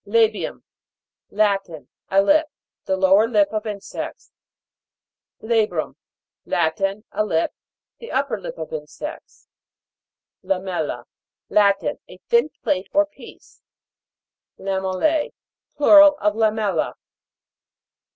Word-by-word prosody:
LA'BIUM. 220 0 +1 0.7
Latin. 195 -9 0 0.2
A 195 +1 +4
lip. 310 +7 +4 0.4
The 190 - 0
lower 195 +3 +4
lip 210 -4 +3
of 215 +1 -2
insects. 205 -2 -7 1.1
LA'BRUM. 215 -8 0 0.5
Latin. 195 +5 -1
A 215 - 0
lip. 165 -6 0 0.5
The 465 - -9
up - - +1
per - - -3
lip - - -7
of - - -7
insects. 485 - -8 0.9
LAMEL'LA. 180 -9 -2 0.5
Latin. 200 -1 +2
A - - -12
thin 470 -8 +3
plate 185 +1 -1
or 300 0 +5
piece. 300 - -16 1.0
LAMEL'LA. 195 - -1 0.4
Plural 295 0 +7
of 210 0 +1
lamella. 215 -2 0
210 Hz, 100 wpm, -22 LUFS, 190-230 Hz, 1.1 s, Plural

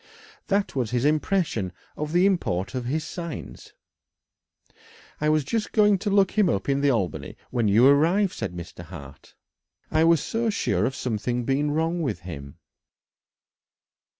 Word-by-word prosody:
That 200 -5 0
was 125 -5 0
his 125 +2 0
impression 150 - +1 0.2
of 150 0 -4
the 175 +3 +4
import 135 - 0
of 125 -2 -3
his 150 +5 -1
signs. 170 -1 -7 1.5
"I 150 - +1
was 155 -1 +3
just 215 +10 -2
going 210 -3 +4
to 205 - -2
look 195 -1 +3
him 210 -5 +3
up 100 - -1
in 140 0 +1
the 145 - +3
Albany 100 - -2
when 120 -4 +1
you 110 +5 +5
arrived," 170 +8 +4
said 105 -5 -4
Mr. 85 0 -8
Hart. 70 -4 -12 0.6
"I 155 +1 +3
was 165 -1 +5
so 225 +9 -1
sure 100 - 0
of 130 - -4
something 120 +1 -2
being 140 +3 +1
wrong 165 +3 0
with 130 - -2
him." 70 -6 -9
145 Hz, 155 wpm, -25 LUFS, 110-175 Hz, 1.5 s, you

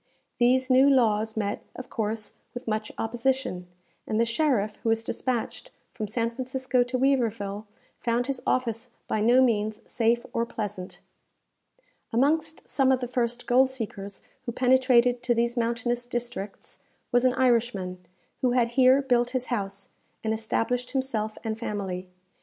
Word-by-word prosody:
These 255 +2 +3
new 265 +2 +6
laws 220 -4 +2
met, 205 -1 -1
of 255 - -9
course, 215 0 -3 0.2
with 245 - -7
much 215 0 -2
opposition, 235 -5 -1 0.4
and 215 - 0
the 230 - +4
sheriff 230 -4 +1
who 230 - -2
was 225 0 +2
despatched 250 - -3 0.2
from 215 -3 -4
San 230 +2 -1
Francisco 255 +1 -1
to 245 +1 0
Weaverville, 225 -6 0 0.3
found 240 +1 0
his 270 -1 -3
office 240 -1 0 0.2
by 215 - 0
no 245 +4 +5
means 215 -3 +1
safe 235 0 +1
or 230 - +1
pleasant. 205 -5 -5 1.1
Amongst 310 +6 +1
some 265 -1 +3
of 260 - +3
the 250 - -3
first 240 -1 -1
gold 260 +2 +4
seekers 205 -6 -6 0.2
who - - 0
penetrated 250 -1 +4
to 240 0 +1
these 235 +1 +1
mountainous 235 0 0
districts, 240 -5 -5 0.3
was 245 -1 +3
an 255 -1 +4
Irishman, 225 -8 +1 0.4
who 250 -2 +2
had 240 -2 +3
here 260 +3 +5
built 245 -2 +2
his 255 - -3
house, 200 -2 -4 0.3
and 220 0 0
established 235 +3 -1
himself 230 -5 -2
and 220 0 -3
family. 190 -5 -4
235 Hz, 150 wpm, -27 LUFS, 220-255 Hz, 1.1 s, new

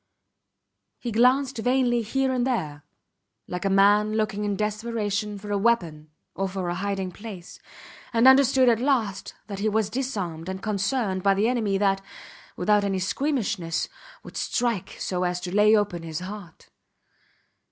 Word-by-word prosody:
He 240 - -5
glanced 250 +3 +3
vainly 245 0 +2
here 265 +4 0
and 250 0 0
there, 155 - -2 0.6
like 180 +1 -4
a - - +2
man 205 +2 +4
looking 215 -1 -1
in 205 -1 0
desperation 210 -1 -2
for 205 +1 -8
a 200 - +1
weapon 170 -9 0 0.2
or 195 +1 -2
for 185 -2 -3
a - - -1
hiding 190 0 -3
place, 195 -3 -10 0.5
and 235 +1 +4
understood 265 -1 +6
at 230 -2 +4
last 235 -7 -1
that 200 -2 -6
he 215 +2 +1
was 215 -1 0
disarmed 195 -10 -3
and 190 0 -6
cornered 200 -1 -1
by 195 +1 +3
the 205 +3 +2
enemy 220 -5 +1
that, 195 -1 +1 0.6
without 205 +3 +3
any 195 -1 0
squeamishness, 200 - -1 0.3
would - - -10
strike 235 -6 -1
so 180 -1 -2
as 180 0 -1
to 180 0 -5
lay 210 +1 +6
open 205 -5 0
his 160 0 -5
heart. 185 -3 -9
205 Hz, 155 wpm, -25 LUFS, 190-235 Hz, 0.6 s, understood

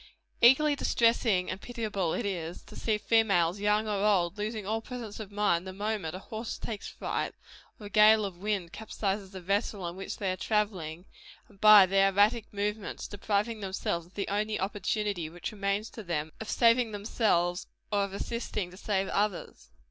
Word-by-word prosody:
Equally 285 +5 +6
distressing 230 -8 +2
and 190 +1 -6
pitiable 215 -8 -2
is 240 - -2
it, 175 -4 -4
to - - -13
see 220 -2 0
females, 200 -5 +2
young 210 +1 +2
or 205 -1 -1
old, 190 -4 +2
losing 210 0 -4
all 220 +2 -1
presence 230 -3 -7
of 210 -2 -7
mind 195 -4 +1
the 190 - -6
moment 205 -4 -3
a 185 - -9
horse 220 +1 -4
takes 215 -3 -6
fright, - - -3 0.4
or 210 - -10
a - - -7
gale 215 +1 +6
of 185 -3 -7
wind 195 -4 -2
capsizes 200 -2 -3
the 190 -1 -8
vessel 195 0 -1
in 170 - -6
which 195 - -6
they 195 -3 -1
are - - -2
travelling, 180 -4 -1 0.4
and 200 -3 -22
by 215 -2 +9
their 195 +1 +4
erratic 210 +3 +2
movements, 205 0 -3
depriving 210 +2 -1
themselves 190 -4 -3
of 180 - -25
the 200 - -2
only 210 +2 -1
opportunity 200 -2 -2
which 175 +1 -6
remains 200 +1 -1
to 225 - -8
them, 160 -5 -3
of 220 - -6
saving 230 -1 +3
themselves 200 -4 0 0.2
or 205 -1 +2
of 200 - -9
assisting 205 -2 -4
to 185 - -13
save 195 -2 -1
others. 205 -2 -2
205 Hz, 180 wpm, -29 LUFS, 185-215 Hz, 0.4 s, by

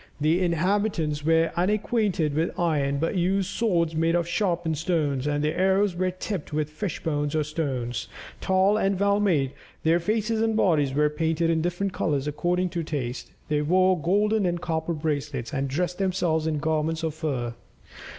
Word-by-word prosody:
The 155 +5 +2
inhabitants 170 -3 0
were 165 +1 +3
unacquainted 200 -4 +1
with 160 +3 -1
iron, 145 -5 +1
but 165 +6 -1
used 190 +2 +1
swords 170 -8 +1
made 165 +1 +1
of 170 -1 +1
sharpened 170 -5 0
stones, 150 -5 0
and 145 0 0
their 150 - 0
arrows 190 +1 +2
were 185 +1 0
tipped 185 -2 -5
with 150 0 -1
fish 170 +2 -4
bones 145 -1 -1
or 155 - +2
stones. 135 -6 -3 0.3
Tall 190 +2 +3
and 195 -2 +1
well 200 0 +3
made, 155 -10 +2 0.3
their 165 +2 +3
faces 220 +4 0
and 225 -1 +1
bodies 150 -9 +2
were 150 +1 +4
painted 160 +2 0
in 160 -1 +1
different 180 +3 -2
colours 145 -3 -1
according 180 +4 0
to 170 -1 -3
taste, 130 -5 -4 0.2
they 150 0 +1
wore 185 +4 +3
golden 205 +5 +2
and 175 0 -1
copper 165 -1 -2
bracelets, 145 -5 -3
and 135 -1 -1
dressed 175 +6 -2
themselves 175 -5 0
in 155 -1 0
garments 160 +2 -1
of 160 -2 -1
fur. 135 -7 -3
165 Hz, 170 wpm, -25 LUFS, 150-185 Hz, 0.3 s, were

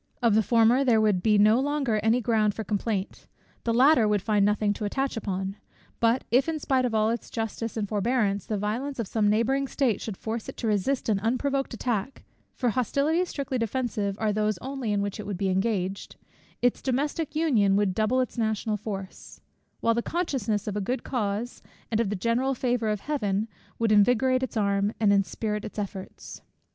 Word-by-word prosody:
Of 235 -4 +3
the 220 - +5
former 235 +4 +4
there 240 -4 +4
would 210 -4 +2
be 210 +2 +3
no 215 +3 +5
longer 275 -5 0
any 225 +3 +2
ground 215 -2 +1
for 220 - -4
complaint; 205 -2 -3 0.4
the 230 - +1
latter 250 0 +5
would 205 -2 +1
find 210 -2 +2
nothing 210 0 +2
to 210 - -5
attach 270 +6 -1
upon. 195 -2 -3 0.4
But 230 +2 +2
if, 255 +6 +3
in 320 - -1
spite 265 -3 +1
of 235 -3 -1
all 215 +1 +3
its 235 - -4
justice 225 0 -4
and 210 -2 -1
forbearance, 205 -1 0
the 215 - -1
violence 235 +8 -3
of 230 -4 -3
some 210 -1 +1
neighbouring 260 +6 +1
state 255 -6 0
should 210 -4 -5
force 225 0 -4
it - - -9
to - - -4
resist 220 +5 0
an 210 -3 +2
unprovoked 260 +4 -1
attack, 235 +1 -3 0.3
(for 245 - 0
hostilities 285 - +1
strictly 275 -3 -3
defensive 220 -4 -2
are 215 -1 +1
those 215 -1 0
only 260 +1 -4
in 200 -1 +1
which 200 +1 -4
it 210 - -6
would 200 -3 -3
be 195 +1 0
engaged) 190 0 -1 0.5
its 245 - +2
domestic 290 +4 -1
union 235 -12 +3
would 200 -2 +2
double 220 +6 +1
its 250 -1 -4
national 220 -1 0
force; 195 -2 -7 0.4
while 230 - +3
the 235 - 0
consciousness 245 - -1
of 210 - -3
a 210 - -1
good 250 +7 -2
cause, 225 -1 -3 0.3
and 220 - +1
of 230 -4 +1
the 210 - -1
general 235 +7 0
favour 240 -3 0
of 210 -2 -1
Heaven, 215 -8 -1 0.3
would 225 -1 +1
invigorate 245 +5 +4
its 260 -3 -3
arm, 200 0 +1
and 210 -2 +4
inspirit 210 +2 -1
its 215 - -8
efforts. 195 -2 -7
220 Hz, 195 wpm, -26 LUFS, 205-255 Hz, 0.5 s, the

